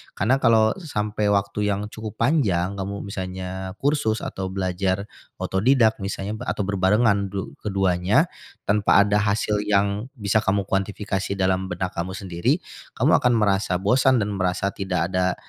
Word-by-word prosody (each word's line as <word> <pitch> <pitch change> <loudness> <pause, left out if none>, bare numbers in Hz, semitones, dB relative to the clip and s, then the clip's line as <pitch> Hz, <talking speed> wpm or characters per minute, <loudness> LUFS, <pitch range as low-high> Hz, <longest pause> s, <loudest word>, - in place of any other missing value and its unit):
Karena 125 +8 +2
kalau 110 -3 +4
sampai 105 - -2
waktu 105 0 0
yang 105 +1 -2
cukup 110 -1 -7
panjang 100 - +1
kamu 100 +1 -4
misalnya 95 -1 -5
kursus 140 -6 0
atau 95 0 -4
belajar 95 +1 -1 0.3
otodidak 110 +3 +2
misalnya 100 +2 -4
atau 105 - -1
berbarengan 100 +1 +2
du 100 -1 -4
keduanya, 95 - +2 0.4
tanpa 100 -1 +4
ada 105 +1 +2
hasil 105 0 0
yang 100 +2 +1
bisa 105 -2 +1
kamu 100 -1 +1
kuantifikasi 100 0 -2
dalam 95 0 +1
benak 90 0 -3
kamu 90 +2 -4
sendiri, 90 -3 -1 0.3
kamu - - +4
akan 125 -1 +3
merasa 100 -4 +1
bosan 125 +7 +3
dan 100 0 -3
merasa 95 +1 0
tidak 90 -3 -1
ada, 90 0 +1
100 Hz, 145 wpm, -23 LUFS, 95-105 Hz, 0.4 s, kalau